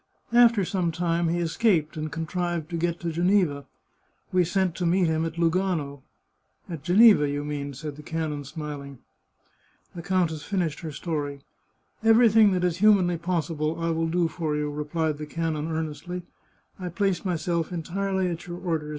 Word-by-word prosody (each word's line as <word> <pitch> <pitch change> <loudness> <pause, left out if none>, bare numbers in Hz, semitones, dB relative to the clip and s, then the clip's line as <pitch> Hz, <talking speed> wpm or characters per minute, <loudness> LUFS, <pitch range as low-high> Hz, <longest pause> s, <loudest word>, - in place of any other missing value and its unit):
After 235 -4 +5
some 175 -2 -1
time 170 0 0
he 170 +1 0
escaped, 170 -2 +1
and 155 -1 -4
contrived 170 0 -3
to - - -2
get 170 0 -1
to 170 -1 -2
Geneva. 175 -4 +1 0.6
We 185 -1 +4
sent 185 0 0
to 180 - -1
meet 180 +2 +3
him 160 0 +1
at 165 0 -5
Lu 170 -1 +3
gano." 160 -7 -1 0.3
" - - -36
At 165 -4 -5
Geneva, 185 -2 +6
you 145 +1 -3
mean," 145 -2 -4
said 145 +2 -7
the - - -9
canon, 155 -2 -3
smiling. 140 -2 -7 1.0
The 170 - -7
countess 170 -4 0
finished 175 -4 -2
her 160 - -6
story. 145 -2 -4 0.3
" - - -39
Everything 225 -2 +6
that 180 -1 0
is 180 -1 +1
humanly 185 -4 +4
possible 165 -2 -2
I 165 0 0
will 165 0 0
do 170 +1 +1
for 160 -2 -3
you," 150 0 -1
replied 150 +1 -2
the 150 - -5
canon 160 0 -2
earnestly. 160 +3 -4 0.3
" - - -38
I 180 -1 -4
place 185 +1 0
myself 170 -2 -1
entirely 190 +2 -1
at 170 -1 -5
your 175 0 -6
orders. 165 -4 -2
165 Hz, 175 wpm, -26 LUFS, 155-180 Hz, 1.0 s, Geneva